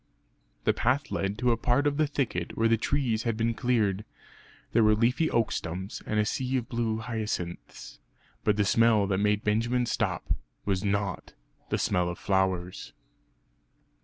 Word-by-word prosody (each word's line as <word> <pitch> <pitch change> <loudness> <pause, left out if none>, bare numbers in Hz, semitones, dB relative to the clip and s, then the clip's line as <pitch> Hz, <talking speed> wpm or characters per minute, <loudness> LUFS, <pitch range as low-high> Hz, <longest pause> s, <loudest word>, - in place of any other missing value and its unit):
The - - +3
path 130 +4 0
led 100 +1 -1
to 125 +1 +2
a 115 - +2
part 125 +5 +2
of 145 -1 +1
the 155 -1 +3
thicket 125 - -2
where 115 - +3
the 115 - +4
trees 115 -1 0
had 115 -2 -1
been 115 +1 +1
cleared; 110 -5 +1 0.7
there 115 - +4
were 105 0 +5
leafy 125 +8 +2
oak 115 -2 +1
stumps, 90 +4 -4
and 105 - +1
a 105 - +3
sea 130 +4 -1
of 120 - -3
blue 115 -2 -1
hyacinths 110 -6 -5 0.4
but 105 -1 +2
the 105 - +2
smell 115 0 +4
that 95 -1 0
made 105 +1 +1
Benjamin 120 +4 +1
stop, - - -1 0.3
was 95 -2 0
not 100 -2 -2 0.4
the - - +1
smell 90 -1 +1
of 85 - -5
flowers! 95 -2 -1
110 Hz, 165 wpm, -28 LUFS, 100-120 Hz, 0.7 s, were